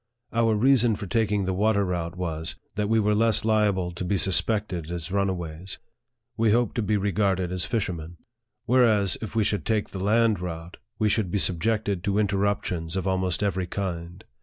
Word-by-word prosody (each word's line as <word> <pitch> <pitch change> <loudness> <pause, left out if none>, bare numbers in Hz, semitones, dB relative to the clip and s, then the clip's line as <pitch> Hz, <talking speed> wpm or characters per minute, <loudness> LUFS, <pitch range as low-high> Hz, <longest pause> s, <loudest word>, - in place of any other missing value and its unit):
Our 115 -1 +2
reason 120 -1 +4
for 100 - -6
taking 105 0 0
the 95 - -1
water 100 +1 +2
route 85 -2 -3
was, 80 -2 -3 0.2
that 105 0 -2
we 115 0 +3
were 105 0 +2
less 110 0 +2
liable 105 -5 +2
to 85 +1 -6
be 95 +2 0
suspected 95 -3 +1
as 85 0 -4
runaways; 95 -3 -2 0.6
we 115 0 +2
hoped 120 -2 +1
to - - +2
be 105 0 +1
re 100 0 0
garded 95 -2 0
as 90 -1 -1
fishermen; 85 -7 -3 0.5
whereas, 110 -6 +3
if 110 -1 -6
we 110 - +3
should 105 0 -1
take 110 -2 0
the 95 -1 -5
land 110 0 +3
route, 85 0 -6 0.2
we 110 - +2
should 105 -2 +1
be 100 - 0
subjected 100 +1 0
to 100 0 +1
interruptions 100 -4 -1
of 95 0 -2
almost 95 0 0
every 95 -3 -1
kind. 90 -2 -5
100 Hz, 185 wpm, -25 LUFS, 90-110 Hz, 0.6 s, reason